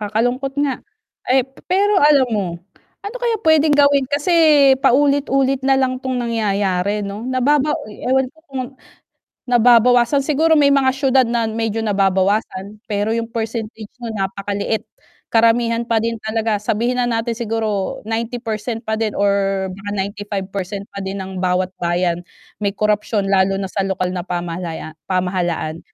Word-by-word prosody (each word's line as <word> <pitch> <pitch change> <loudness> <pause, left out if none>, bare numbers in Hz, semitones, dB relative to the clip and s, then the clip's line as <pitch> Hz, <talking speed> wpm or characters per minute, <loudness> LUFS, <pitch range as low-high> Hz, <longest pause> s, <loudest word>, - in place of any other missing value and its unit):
Kakalungkot 245 +6 -1
nga. 270 -3 -2 0.5
Ay 260 0 +4 0.2
pero 395 +2 +3
alam 285 -3 +5
mo, 205 -3 0 0.6
ano 410 +5 -5
kaya 470 -2 +1
puwedeng 310 -2 +4
gawin 280 -2 +4
kasi 290 +5 0 0.5
paulit-ulit 275 0 +2
na 270 0 +2
lang 255 -1 0
'tong 260 -1 -3
nangyayari 205 -4 0
'no, 200 +1 -6
nababa 285 +3 +2
oy 210 - -12
ewan 265 +1 +3
ko 320 - -29
kung 265 -1 -3 0.9
nababawasan 245 +2 +4
siguro 310 +3 +2
may 295 -3 +5
mga 275 -2 +3
siyudad 270 -1 +3
na 230 -1 0
medyo 225 0 -2
nababawasan, 200 0 0
pero 210 +1 -1
'yung 230 0 -4
percentage 225 -1 -4
mo 235 -2 -6
napakaliit. 200 +2 -2 0.5
Karamihan 230 0 +3
pa 230 - +2
din 230 0 -2
talaga 220 -1 -1
sabihin 235 +4 0
na 245 - +1
natin 230 0 -1
siguro 220 -3 -2
90% 225 0 -4
pa 220 - -3
din 215 -2 -1
or 195 -1 +1
baka 195 +2 -7
95% 200 0 -4
pa 200 - -6
din 195 0 -4
ng 190 -1 -6
bawat 185 0 0
bayan 175 0 0 0.4
may 200 - +1
korapsyon 210 0 0
lalo 195 0 +2
na 195 - -3
sa 195 +1 -2
lokal 185 -1 -2
na 180 - -3
pamahalaya 175 -2 -5 0.2
pamahalaan. 180 -3 -1
225 Hz, 145 wpm, -19 LUFS, 195-255 Hz, 0.9 s, alam